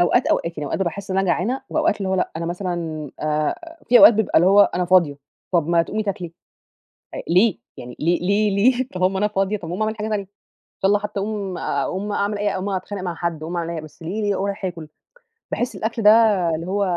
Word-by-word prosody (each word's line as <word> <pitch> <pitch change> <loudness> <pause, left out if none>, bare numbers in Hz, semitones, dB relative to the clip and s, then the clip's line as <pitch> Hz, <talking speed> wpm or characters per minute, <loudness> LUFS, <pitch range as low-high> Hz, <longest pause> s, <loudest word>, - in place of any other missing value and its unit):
أوقات، 175 - +3
أوقات 170 -1 0
يعني 150 - -3
أوقات 195 - -1
باحس 190 +3 -4
إن 190 - 0
أنا 195 - +1
جعانة 205 +10 0
وأوقات 315 +2 +1
اللي 195 -2 -3
هو 190 - +1
لأ 185 - 0
أنا 165 +1 -3
مثلًا 170 -5 -4
آآ 155 - -2
في 245 +1 +7
أوقات 230 - +9
بيبقى 220 -1 +2
اللي 175 - +3
هو 200 +1 +7
أنا 180 0 0
فاضية 170 -6 +3 0.3
طَب 170 -2 +2
ما 170 -1 +4
تقومي 215 +5 -3
تاكلي، 185 -5 -4 0.8
آآ، - - -5
ليه؟ 185 - +3 0.2
يعني 125 0 -9
ليه 170 +3 +2
ليه 200 +3 +2
ليه؟ 255 +4 +3
طَب 185 - -3
أما 190 +1 +2
أنا 210 +1 +2
فاضية 195 0 0
طَب 165 - -8
ما 180 +5 -3
أعمل 215 +1 -1
حاجة 215 0 -4
تانية 210 -2 -1
إن - - -27 0.5
شاء 195 - +4
الله 205 +1 +4
حتى 205 -1 -4
أقوم 200 -3 -3
آآ، 140 - -1
أقوم 205 +2 -3
أعمل 205 +1 -1
أي 205 0 0
أقوم 190 +1 -3
أتخانق 190 0 -4
مع 175 -2 -3
حد، 165 -2 -3
أقوم 170 +3 -4
أعمل 170 -1 -2
أي 170 - -4
حا 160 - -3
بس 155 +1 -14
ليه 195 +7 -3
ليه 205 -1 +1
أروح 200 +1 -3
آكل؟ 170 -4 -5 0.6
باحس 245 +1 -2
الأكل 225 +1 -3
ده 210 - +8 0.5
اللي 165 +2 -6
هو 200 +2 0
190 Hz, 240 wpm, -21 LUFS, 170-210 Hz, 0.8 s, أوقات